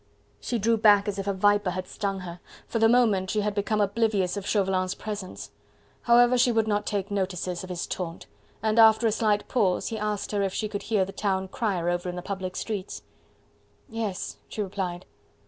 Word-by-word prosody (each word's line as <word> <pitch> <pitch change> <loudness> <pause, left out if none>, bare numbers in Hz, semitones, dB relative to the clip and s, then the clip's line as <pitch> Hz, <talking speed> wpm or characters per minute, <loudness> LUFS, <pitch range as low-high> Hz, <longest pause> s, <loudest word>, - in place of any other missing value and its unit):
She 240 - -2
drew 225 +2 +2
back 210 -1 +5
as 200 -1 -2
if 195 - -4
a 200 - +1
viper 205 0 +3
had 185 0 -4
stung 195 0 -3
her; 175 -1 -8 0.3
for 230 - -2
the 225 0 +5
moment 215 -6 +3
she 215 - +1
had 210 0 -1
become 210 +1 0
oblivious 205 -2 +1
of 200 -1 -5
Chauvelin's 190 -2 +1
presence. 205 -3 -6 0.5
However, 245 +1 +5
she 245 0 +4
would 225 -1 +1
not 205 -1 0
take 200 -1 -2
notice 190 -3 -1 0.2
of 185 - -9
his 175 -1 -3
taunt, 170 -3 -5 0.4
and, 220 +1 +2
after 220 0 +6
a 225 - +4
slight 210 -2 +1
pause, 195 -7 +1
he 220 - -4
asked 210 -1 -2
her 205 -1 0
if 195 -1 -1
she 215 - -1
could 205 -1 -5
hear 205 -3 +1
the 195 - -8
town 190 -1 -1
crier 190 -6 -1
over 175 +1 -1
in 180 - -5
the 180 - -6
public 190 -2 -4
streets. 205 -4 -4 0.8
"Yes," 220 -4 -4
she 215 - -3
replied. 185 -2 -4
205 Hz, 200 wpm, -26 LUFS, 190-220 Hz, 0.8 s, after